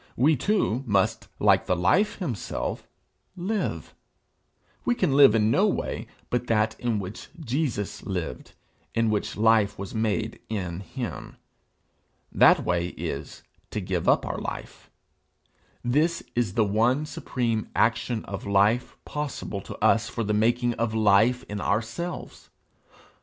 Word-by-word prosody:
We 150 +6 +4
too 135 - +1
must, 100 -3 +1
like - - +3
the 90 - +2
Life 180 - +2
himself, 135 - -4 0.5
live. 195 +4 -3 0.9
We 245 - +1
can 170 - +1
live 140 -6 +7
in 110 0 +3
no 200 - +4
way 200 - -2 0.2
but 125 0 -1
that 110 -1 +2
in 120 -3 0
which 100 0 -6
Jesus 130 - -2
lived, 85 -9 -5 0.4
in 115 -1 +2
which 105 - -2
life 110 -2 +3
was 100 -1 -6
made 110 0 -1
in 90 -6 -3
him. 105 - -6 0.9
That - - +5
way 85 0 +1
is, 70 +1 -5 0.3
to - - -3
give 90 -3 -1
up - - +3
our - - -3
life. - - -7 0.9
This 155 +7 +1
is 120 -6 -1
the 110 - +3
one 120 +8 +2
supreme 115 -7 -2
action 115 -3 +1
of 100 0 -6
life 100 +5 +2
possible 145 -9 -4
to - - -8
us 115 +1 +3
for 115 - -3
the 105 0 -1
making 120 +3 +2
of 115 -1 0
life 110 +4 +4
in 105 -1 -4
ourselves. 115 - -3
110 Hz, 135 wpm, -26 LUFS, 100-125 Hz, 0.9 s, live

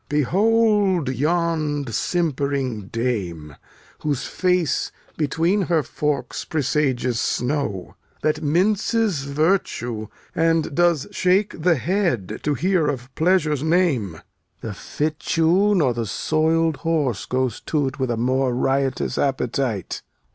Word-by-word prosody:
Behold 200 - +2
yond 150 -1 0
simp'ring 140 - -1
dame, 95 - -3 0.4
Whose 145 -4 -2
face 180 -3 0 0.2
between 165 +6 +1
her 165 -3 +3
forks 150 -1 -2
presageth 130 -5 0
snow, 125 -8 -1 0.3
That 155 0 +1
minces 190 +1 +1
virtue, 140 - 0 0.3
and 165 -2 +1
does 170 -3 +2
shake 185 -1 +1
the 175 +1 +4
head 140 - -1
To 145 -1 0
hear 180 +1 +1
of 130 -1 -4
pleasure's 155 -4 +2
name. 150 - +1 0.4
The 110 - -5
fitchew 160 - +1
nor 145 -9 +3
the 115 -1 -3
soiled 160 +6 +1
horse 150 - -1
goes 130 -1 -1
to't 145 -2 -2
With 130 -1 0
a 120 - -1
more 130 +1 +1
riotous 135 0 0
appetite. 125 - -1
150 Hz, 110 wpm, -22 LUFS, 130-170 Hz, 0.4 s, the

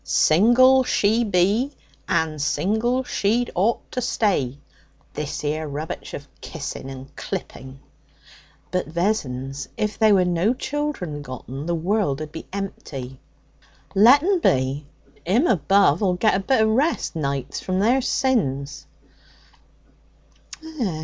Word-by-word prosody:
'Single 245 +10 +5
she 225 -1 +2
be, 205 +6 +2 0.4
and 155 -2 0
single 220 - 0
she'd 235 +1 0
ought 205 +6 0
to 250 - -2
stay. 185 - 0 0.6
This 150 0 -4
'ere 155 +1 -2
rubbitch 150 +3 -6
of 140 - -9
kissing 140 -3 -6
and 135 0 -10
clipping!' 130 +1 -7 0.9
'But, 180 -4 -1
Vessons, 140 -7 -2
if 210 0 -2
there 215 -2 +5
were 185 -1 +3
no 180 +7 +1
children 265 - -3
gotten, 135 +2 -7
the 175 - 0
world'd 160 -5 -1
be 160 - -9
empty.' 135 -10 -6 0.7
'Let 245 +9 +6
'un 380 0 +2
be. 135 - +1 0.4
'Im 230 - +3
above'll 195 - +3
get 215 +4 +2
a 190 - +1
bit 225 +4 +2
of 220 - +3
rest, 270 - 0
nights, 140 -3 -3
from 185 0 -2
their 240 +6 +3
sins.' 150 - -1
180 Hz, 120 wpm, -23 LUFS, 145-225 Hz, 0.9 s, Let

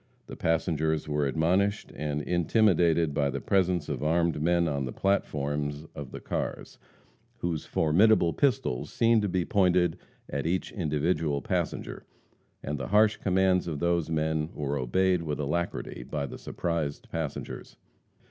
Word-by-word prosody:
The - - -9
passengers 80 -1 0
were 75 -1 0
admonished 90 +8 +1
and 75 +1 -2
intimidated 85 -3 +3
by 70 0 +1
the 70 0 -3
presence 90 -2 +1
of - - -3
armed 85 0 +1
men 85 +1 +2
on 70 -3 -1
the 60 - -4
platforms 75 -5 -1
of 70 -3 -7
the - - -8
cars, - - -4 0.6
whose 85 -3 -3
formidable 85 +2 +4
pistols 115 - 0
seemed 115 -1 +3
to 105 - -1
be 90 -1 0
pointed 90 -4 +2 0.3
at 70 +2 -3
each 90 +2 -1
individual 75 -3 0
passenger, - - -3 0.6
and 75 0 -3
the - - -4
harsh 105 +1 +4
commands 95 -1 +2
of 80 -3 -3
those 85 0 0
men 80 -1 0
were 70 -1 -2
obeyed 90 +8 +1
with 75 -3 -3
alacrity 75 -2 -2
by 70 +3 -3
the - - -8
surprised 80 -4 -3
passengers. 80 -3 -5
80 Hz, 145 wpm, -28 LUFS, 75-90 Hz, 0.6 s, formidable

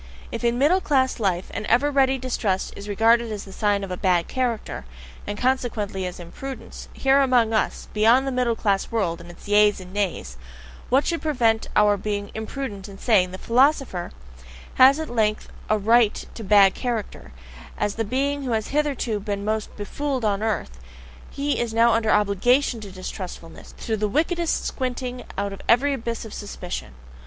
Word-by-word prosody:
If 230 - -5
in 235 0 +2
middle 315 +8 +3
class 260 -5 +1
life 185 -4 -1
an 210 - -4
ever 275 +5 +3
ready 270 -1 +3
distrust 230 -7 -2
is 200 +1 -8
regarded 230 +3 +3
as 210 -2 -5
the 195 - -12
sign 205 -1 +1
of 195 - -6
a 180 - -3
"bad 180 -3 +1
character," 245 -4 -2 0.4
and 205 0 -4
consequently 225 -7 -1
as 180 - -8
an 170 -1 -9
imprudence, 270 +7 -8
here 270 +1 +3
among 245 -4 +3
us, 220 - -1
beyond 230 +5 +4
the 270 - -1
middle 250 -2 +1
class 200 -3 0
world 180 -7 -1
and 170 - -12
its 175 - -13
Yeas 205 0 +4
and 185 0 -11
Nays, 180 - -2 0.5
what 265 +3 +3
should 335 -1 -1
prevent 235 -7 +1
our 210 -1 +4
being 205 0 -3
imprudent 220 -3 -5
and 195 -1 -12
saying: 200 -7 +3
the 185 - -7
philosopher 250 - +1 0.6
has 270 +3 +6
at 315 - -3
length 215 -3 0 0.2
a 215 - +3
RIGHT 225 +1 +3
to 225 - -8
"bad 200 -2 +6
character," 235 -4 -4 0.5
as 210 -1 -1
the 225 - -2
being 275 +5 -1
who 255 -4 -2
has 220 -1 -1
hitherto 280 -7 0
been 200 0 -4
most 215 0 -2
befooled 260 +4 -3
on 205 -1 +1
earth 210 - -2 0.5
he 285 +1 -2
is 230 -2 -2
now 230 +1 +5
under 225 -1 +1
OBLIGATION 220 +5 +2
to 200 -2 -9
distrustfulness, 185 -3 -8
to 225 - -1
the 210 0 -1
wickedest 335 - 0
squinting 250 -1 -4
out 200 0 -2
of 195 - -9
every 275 +5 +4
abyss 235 -3 -4
of 220 - -9
suspicion. 175 - -6
220 Hz, 180 wpm, -23 LUFS, 200-255 Hz, 0.6 s, has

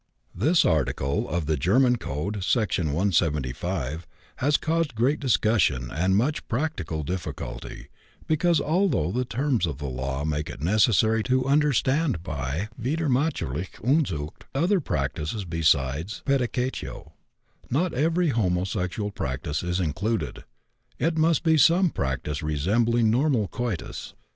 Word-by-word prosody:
This 155 - +3
article 70 -3 0
of 85 0 -1
the 80 +1 +1
German 125 - +3
Code 95 +4 -4
(Section 100 -6 +1
175) 80 -2 -1 0.3
has 145 +3 +2
caused 160 -5 -1
great 130 +7 +2
discussion 105 - +2
and 95 +5 +1
much 130 +9 0
practical 110 - -2
difficulty, 85 -7 -6 0.4
because, 165 +1 +2
although 155 - +1
the 125 +4 -1
terms 125 -5 0
of 75 -5 -4
the 70 - -6
law 65 +2 -3
make 75 -1 -2
it - - -8
necessary 110 - +3
to 130 0 +1
understand 140 - +2
by 75 - -3
widernatürliche 130 - -1
Unzucht 100 - 0
other 180 +7 +2
practices 75 - -2
besides 80 +1 0
pædicatio, 130 -1 -2 0.6
not 160 +7 0
every 165 +5 +2
homosexual 95 -2 -1
practice 70 -3 -3
is 90 +1 -1
included; 90 - -2 0.5
it 165 +1 0
must 160 0 +2
be 160 -2 +4
some 170 +4 +5
practice 65 +3 -2
resembling 110 +10 +2
normal 125 -4 +2
coitus. 115 -8 -5
105 Hz, 120 wpm, -25 LUFS, -, 0.6 s, some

